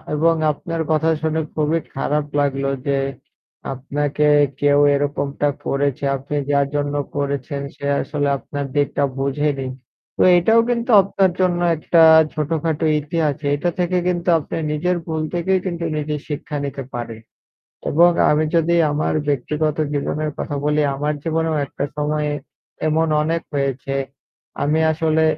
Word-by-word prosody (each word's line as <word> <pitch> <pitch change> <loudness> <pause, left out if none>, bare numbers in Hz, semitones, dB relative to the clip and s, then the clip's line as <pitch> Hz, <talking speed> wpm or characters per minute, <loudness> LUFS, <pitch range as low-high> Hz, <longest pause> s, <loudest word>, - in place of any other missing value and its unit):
এবং 165 +2 +3 0.2
আপনার 165 +2 -4
কথা 160 +1 +2
শুনে 160 0 0
খুবই 155 +2 +1 0.2
খারাপ 145 +2 0
লাগলো 135 -1 0 0.2
যে 140 -1 +2 0.8
আপনাকে 145 +3 -1 0.3
কেউ 145 0 +4 0.2
এরকমটা 145 0 -1 0.2
করেছে, 140 0 -1
আপনি 140 +2 -6 0.2
যার 140 -1 +2
জন্য 145 0 -1 0.2
করেছেন 140 0 -2
সে 140 - -8 0.2
আসলে 145 -1 -2
আপনার 140 +1 -5
দিকটা 145 0 +1 0.2
বুঝে 140 +2 0
নি। 135 - -3 0.5
তো - - +3
এটাও 225 +6 +4
কিন্তু 240 0 0
আপনার 190 -1 +1
জন্য 180 -1 +2 0.2
একটা 165 +2 +2 0.3
ছোটখাটো 160 +1 -1
ইতিহাস 150 -1 -1
যে 145 - -2
এটা 175 +5 -1
থেকে 180 +1 +1
কিন্তু 175 -1 0
আপনি 145 - -6 0.2
নিজের 175 +4 0
ভুল 160 -1 -2
থেকেই 185 +2 +1
কিন্তু 170 -2 -3
নিজে 150 0 -2
শিক্ষা 150 0 -4
নিতে 140 0 -5
পারে। 120 -1 -5 0.7
এবং 170 +4 +5 0.2
আমি 150 +1 +2
যদি 170 +1 +3 0.2
আমার 150 +1 0
ব্যক্তিগত 150 +2 -1 0.2
জীবনের 150 +1 -2
কথা 145 - -4
বলি, 150 0 +2
আমার 150 +2 -1
জীবনেও 160 -1 0
একটা 140 - -4
সময়ে 150 0 0 0.6
এমন 160 +1 +2
অনেক 165 +2 0
হয়েছে। 135 -1 -2 0.7
আমি 150 +2 +2
আসলে 160 0 +1
150 Hz, 140 wpm, -20 LUFS, 145-165 Hz, 0.8 s, এবং